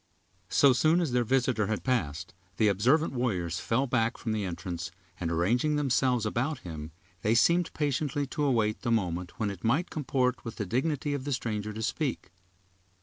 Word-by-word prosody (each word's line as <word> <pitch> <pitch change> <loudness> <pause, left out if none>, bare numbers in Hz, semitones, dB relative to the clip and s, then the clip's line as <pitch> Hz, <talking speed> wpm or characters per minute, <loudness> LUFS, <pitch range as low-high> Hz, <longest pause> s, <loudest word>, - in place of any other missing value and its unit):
So 140 +6 +5
soon 155 +7 +3
as 165 -7 0
their 125 0 +2
visitor 125 -3 +1
had 105 -5 -2
passed, 90 - -1 0.2
the 110 -2 +4
observant 130 - +2
warriors 90 -10 -1
fell 130 +4 +1
back 120 -2 0
from 115 - -3
the 110 -1 -1
entrance, 90 -1 -4 0.3
and 85 - -2
arranging 115 - +1
themselves 130 -4 +2
about 125 +5 -1
him, 80 -2 -7 0.3
they 110 +2 +2
seemed 170 +8 +3
patiently 145 -1 -1
to 145 +2 -3
await 115 -6 +1
the - - -2
moment 90 -4 -1
when 105 -3 0
it 95 -3 -10
might 140 +11 +1
comport 130 -3 0
with 115 -2 -6
the 105 - -3
dignity 145 - -1
of 140 -2 -3
the 145 - -3
stranger 105 -4 -2
to 110 +1 -5
speak. 130 - -2
120 Hz, 180 wpm, -29 LUFS, 105-135 Hz, 0.3 s, So